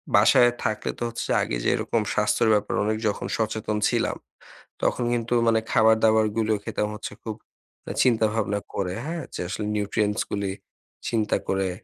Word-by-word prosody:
বাসায় 120 -1 +6
থাকলে 110 0 -1
তো - - -2
হচ্ছে 115 - -5
আগে - - -1
যেরকম 115 - +1
স্বাস্থ্যের 105 +1 +2
ব্যাপারে 105 0 0
অনেক 110 0 0
যখন 105 - -2
সচেতন 110 -1 -1
ছিলাম, - - 0 0.7
তখন 125 - +1
কিন্তু 120 0 -1
মানে 115 -1 +4
খাবার-দাবার 110 0 +4
গুলো 110 -1 +2
খেতাম 105 - -2
হচ্ছে 105 - -7
খুব 110 -2 -4 0.5
আ - - -2
চিন্তা-ভাবনা 110 -4 +1
করে, 90 -2 -2
হ্যাঁ? 165 -1 -4
যে - - -6
আসলে 105 +3 -3
Nutrients 105 0 0
গুলি 100 -1 -2 0.6
চিন্তা 110 -3 +1
করে, 95 -1 +1
110 Hz, 150 wpm, -25 LUFS, 105-115 Hz, 0.7 s, বাসায়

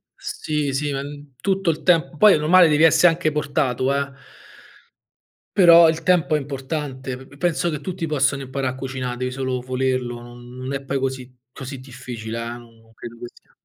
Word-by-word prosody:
sì, 150 -3 -3
sì, 145 +2 -1
ehm, 145 0 -6
tutto 195 -2 0
il 155 - -2
temp 165 -3 +2
poi 210 +2 +7
è - - +3
normale 170 +3 +6
devi 150 +1 +3
esse 165 +2 +5
anche 165 -2 +1
portato, 140 -3 0
eh. 140 0 -1 1.4
Però 170 -3 +8
il 160 0 -2
tempo 175 -3 +3
è - - +1
importante. 135 -1 -5
P 130 - -13
p 145 - -17
penso 175 0 0
che 150 - -4
tutti 180 -3 -4
possano 140 -2 0
imparà 130 0 -3
a 130 - -5
cucina', 130 -2 -4
devi 125 +1 -3
solo 130 -1 -2
volerlo, 130 -1 -2
non 120 +1 -12
non 130 +2 -5
è 140 - -3
poi 135 0 -2
così 130 -1 -4 0.2
così 135 0 -8
difficile, 125 -4 -7
eh. 115 - -5
Non 115 -1 -19
credo 120 +1 -10
che - - -7
sia - - -25
135 Hz, 190 wpm, -22 LUFS, 130-155 Hz, 1.4 s, Però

